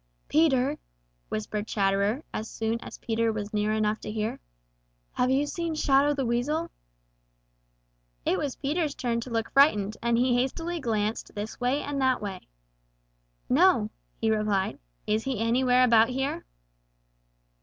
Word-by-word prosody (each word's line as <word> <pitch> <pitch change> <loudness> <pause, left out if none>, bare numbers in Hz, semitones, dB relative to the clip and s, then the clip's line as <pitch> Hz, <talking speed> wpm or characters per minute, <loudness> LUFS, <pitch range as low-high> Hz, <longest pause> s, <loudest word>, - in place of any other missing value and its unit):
"Peter," 290 -2 +3 0.5
whispered 205 - -3
Chatterer, 200 +6 +1
as 220 - -4
soon 225 +1 -2
as - - -9
Peter 230 0 0
was 210 -1 -5
near 210 0 +1
enough 215 0 0
to - - -6
hear, 215 0 -2 0.7
"have 250 - +1
you 270 +2 +2
seen 335 +1 -3
Shadow 285 0 +3
the 270 -2 -1
Weasel?" 290 +8 -1 1.5
It 185 - +1
was 280 -3 -2
Peter's 295 +1 -1
turn 235 -2 -1
to 255 - -7
look 225 -1 -2
frightened, 215 -8 +4
and 235 0 +2
he 250 +1 +3
hastily 330 +8 -1
glanced 220 -4 -2
this 210 +1 -5
way 255 +4 0
and 285 -1 -3
that 260 -1 +3
way. 200 -3 -6 1.0
"No," 260 - +4 0.3
he 225 -1 +1
replied. 210 -3 0 0.3
"Is 215 +1 0
he 265 -3 -1
anywhere 250 +2 +3
about 230 -2 +5
here?" 265 - -3
235 Hz, 145 wpm, -27 LUFS, 215-275 Hz, 1.5 s, about